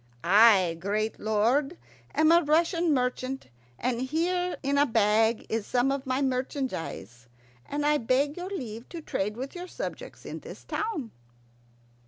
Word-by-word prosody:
"I, 190 -3 +6
great 210 +4 -2
lord, 240 +9 +1 0.4
am 310 +1 +5
a 340 +1 +6
Russian 335 +2 +2
merchant, 255 - -1 0.3
and 245 - -1
here 350 +6 0
in 280 +1 +1
a 290 - +4
bag 220 0 +2
is 220 -2 -2
some 250 +2 +2
of 275 0 -3
my 260 +2 0
merchandise, 250 - -3 0.4
and 290 +1 -2
I 300 0 +3
beg 270 +5 +1
your 360 +1 -5
leave 235 - -6
to 335 - -7
trade 210 -6 -3
with 265 +2 -5
your 360 0 -7
subjects - - -7
in - - -6
this - - -11
town." 350 - -3
260 Hz, 150 wpm, -28 LUFS, 220-310 Hz, 0.4 s, I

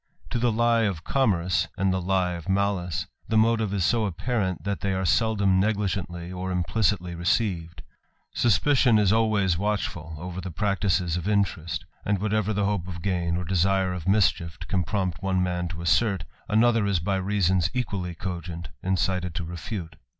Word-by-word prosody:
To 120 - 0
the 120 0 +2
lie 115 +1 +3
of 90 -6 -2
commerce, 90 -10 +1
and 95 0 +2
the 95 - -1
lie 90 0 +1
of 85 +1 -6
malice, 95 -3 0 0.2
the 110 - +1
motive 110 -2 +3
s 100 -4 0
so 115 -2 +2
apparent, 95 -1 -2
that 100 -1 -2
they 100 -1 0
are 95 0 -1
seldom 100 +1 +3
negligently 95 -4 -1
or 95 0 -4
implicitly 90 +1 0
■eceived: 85 -3 -1 0.5
suspicion 120 +1 +4
is 105 -1 +4
always 105 -6 +2
watchful 95 -6 -2
over 90 +3 -6
the 90 - -5
practices 90 -2 0
of 90 - -4
merest; 95 -6 0 0.2
and 100 0 +1
whatever 110 +1 0
the 105 -1 0
hope 100 -3 -1
of 85 -2 -7
gain, 85 -3 0
or 90 - -3
desire 95 +1 +2
of 90 -3 -6
nischief, 90 -5 +2
can 95 -2 0
prompt 95 -3 -2
one 95 -1 +1
man 90 -1 -1
to 85 0 -6
assert, 90 +2 +2 0.3
another 115 -1 +3
is 100 -2 +2
by 95 +3 0
vasons 95 -3 +1
equally 100 -8 -3
cogent 85 -3 -5
incited 90 -2 0
to 85 - -2
refute. 85 -1 -6
95 Hz, 170 wpm, -26 LUFS, 85-105 Hz, 0.5 s, suspicion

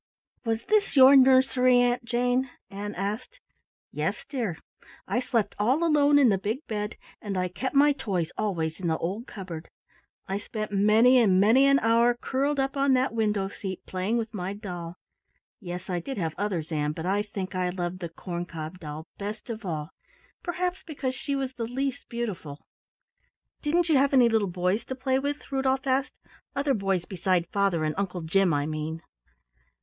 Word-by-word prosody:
"Was 225 0 -1
this 425 -4 +2
your 265 +1 +9
nursery, 260 -1 +5
Aunt 245 0 +2
Jane," 245 +2 0 0.2
Ann 205 +1 -5
asked. 215 - -4 0.5
"Yes, - - -2
dear. 230 - -3 0.5
I - - +1
slept 235 -4 0
all 255 +10 +2
alone 295 -3 +4
in 275 -4 +6
the 195 -3 +2
big 220 - -3
bed, 210 0 -4 0.2
and 200 -3 -3
I 180 0 +1
kept 255 +11 -4
my 290 +1 +6
toys 195 - -2
always 165 -6 -2
in 180 - -2
the 160 -1 +1
old 200 +9 -4
cupboard. 175 -5 -8 0.6
I 195 +1 -2
spent 215 +1 -5
many 215 +5 +5
and 195 -6 +4
many 235 +7 +5
an 275 0 +5
hour 235 0 +3
curled 275 +4 -1
up 270 +1 0
on 275 -1 +3
that 255 -1 +2
window 210 -3 0
seat, 190 -1 -7
playing 190 +5 -1
with 225 -1 -3
my 190 -1 -3
doll. 175 -5 -7 0.6
Yes, 180 -4 -6
I 180 -2 -1
did 265 +9 -6
have 165 -4 -1
others, 180 -5 -2
Ann, 150 -1 0
but 160 +2 -6
I 195 +3 +1
think 200 -3 -5
I 180 -1 0
loved 180 0 -3
the 170 -2 -5
corn 175 +1 -5
cob 160 +2 -7
doll 155 -1 -7
best 210 +3 -5
of 225 0 -7
all, 155 -2 -4 0.5
perhaps 360 +1 -2
because 275 -5 -4
she 280 +2 -3
was 265 -1 -2
the 230 -3 -4
least 265 +2 -3
beautiful." 200 -11 -5 1.0
"Didn't 335 +3 +1
you 310 -4 +4
have 275 +1 +3
any 245 -3 +6
little 220 -4 +1
boys 180 +5 0
to 260 - -5
play 260 0 0
with?" 285 +2 -4
Rudolf 265 0 0
asked. 270 +1 0 0.4
"Other 280 0 +1
boys 195 -5 0
beside 180 -2 0
father 195 -5 +1
and 155 0 0
Uncle 185 -3 -2
Jim, 180 +3 +2
I 145 -1 +1
mean." 155 +1 -4
215 Hz, 180 wpm, -27 LUFS, 180-260 Hz, 1.0 s, your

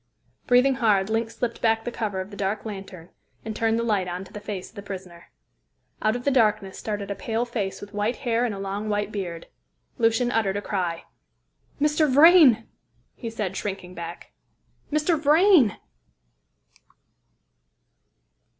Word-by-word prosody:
Breathing 250 +2 +5
hard, 205 -2 +3
Link 225 0 0
slipped 230 +1 -4
back 225 -1 +2
the 240 - -2
cover 210 -5 -3
of 190 +2 -6
the - - -8
dark 200 +2 -2
lantern 195 -5 -8 0.4
and 220 -1 -4
turned 225 0 +1
the 230 - 0
light 205 -5 0
on 180 +1 -4
to 190 - -15
the 210 - -6
face 205 -3 -6
of - - -24
the 200 - -7
prisoner. 185 -4 -9 0.7
Out 215 +1 +2
of 245 - -4
the 280 - +3
darkness 215 -6 +2
started 205 -2 -4
a - - -2
pale 225 +4 -2
face 215 -5 -3
with 205 +1 -11
white 210 +3 0
hair 235 -2 0
and 215 -5 -2
long 200 +2 -4
white 205 0 -1
beard. 175 -5 -5 0.5
Lucian 230 +1 +2
uttered 205 -4 +1
a - - 0
cry. 175 -4 -2 0.8
"Mr. 300 0 +2
Vrain!" 290 -6 +7 0.5
he 230 - -6
said, 210 -4 -4
shrinking 190 -3 -5
back, 170 -1 -8 0.6
"Mr. 305 +2 +1
Vrain!" 305 - +5
215 Hz, 160 wpm, -25 LUFS, 195-240 Hz, 0.8 s, Vrain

